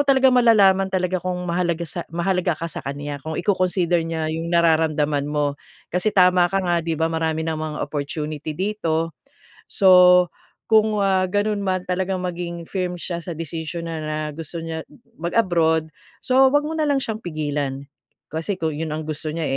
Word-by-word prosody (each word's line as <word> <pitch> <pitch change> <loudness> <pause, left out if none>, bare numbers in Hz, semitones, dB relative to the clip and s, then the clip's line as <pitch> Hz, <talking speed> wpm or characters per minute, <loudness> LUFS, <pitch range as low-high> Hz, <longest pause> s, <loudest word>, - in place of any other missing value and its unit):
talaga 270 -2 +4
malalaman 200 -6 +5
talaga 185 -1 -1
kung 180 0 -3
mahalaga 170 -1 -1
sa, 170 +1 -6
mahalaga 175 0 0
ka 165 - -6
sa - - -5
kanya 145 +1 -5
kung 160 +2 -5
i-coconsider 180 -2 +1
niya 160 -1 -2
yung 165 +1 -3
nararamdaman 155 -4 +2
mo. 145 -1 -1 0.3
Kasi 180 +5 +1
tama 180 -3 +4
ka 195 - -2
nga 175 -1 +1
'di 165 -1 -2
ba, 165 +1 0
marami 160 0 -1
namang 155 -1 -3
opportunity 150 +1 -4
dito. 165 -5 -1 0.6
So, 180 -2 +6 0.4
kung, 215 -1 +4
ah, 190 -1 +2
ganun 205 +2 0
man 185 -1 0
talagang 185 0 -2
maging 170 -1 -4
firm 180 +1 -3
siya 170 0 -3
sa 170 -1 -6
desisyon 165 +1 -5
na 165 - -4
na 155 0 -3
gusto 165 +2 -7
niya 160 -1 -5 0.3
mag-abroad, 170 -4 +1 0.3
so, 265 +1 +5
huwag 290 +2 +3
mo 310 +2 -3
na 305 - +2
lang 285 -1 +2
siyang 220 -1 -3
pigilan. 145 -5 -3 0.5
Kasi 160 +5 -2
kung 160 -3 -2
yun 160 +2 -4
ang 155 - -4
gusto 155 0 -4
niya, 165 - -2
170 Hz, 170 wpm, -22 LUFS, 160-185 Hz, 0.6 s, So